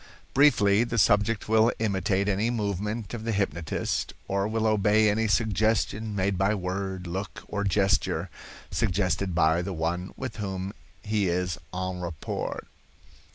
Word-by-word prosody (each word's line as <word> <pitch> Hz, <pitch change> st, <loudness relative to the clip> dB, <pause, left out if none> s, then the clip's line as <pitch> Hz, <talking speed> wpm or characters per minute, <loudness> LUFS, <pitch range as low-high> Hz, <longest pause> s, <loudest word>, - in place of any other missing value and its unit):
Briefly, 115 Hz, -7 st, +5 dB
the 115 Hz, -1 st, -3 dB
subject 105 Hz, 0 st, +3 dB
will 110 Hz, +2 st, +4 dB
imitate 100 Hz, -2 st, 0 dB
any 105 Hz, +3 st, +1 dB
movement 105 Hz, -1 st, -2 dB
of 115 Hz, -2 st, -5 dB
the 115 Hz, -, -1 dB
hypnotist, 85 Hz, -6 st, -1 dB
or 100 Hz, +1 st, 0 dB
will 110 Hz, 0 st, -1 dB
obey 110 Hz, 0 st, +4 dB
any 110 Hz, +2 st, +1 dB
suggestion 110 Hz, 0 st, +1 dB
made 95 Hz, -1 st, 0 dB
by 100 Hz, +3 st, +2 dB
word, 95 Hz, 0 st, -3 dB
look 95 Hz, +4 st, -5 dB
or 100 Hz, -1 st, -2 dB
gesture, 100 Hz, 0 st, +1 dB, 0.4 s
suggested 95 Hz, -3 st, 0 dB
by 80 Hz, 0 st, +3 dB
the 95 Hz, +2 st, -4 dB
one 90 Hz, +3 st, -2 dB
with 130 Hz, -4 st, -5 dB
whom 95 Hz, -2 st, -4 dB, 0.3 s
he 105 Hz, -3 st, +1 dB
is 90 Hz, -1 st, -1 dB
en 95 Hz, 0 st, -3 dB
rapport. 85 Hz, -4 st, -4 dB
100 Hz, 140 wpm, -27 LUFS, 95-110 Hz, 0.4 s, Briefly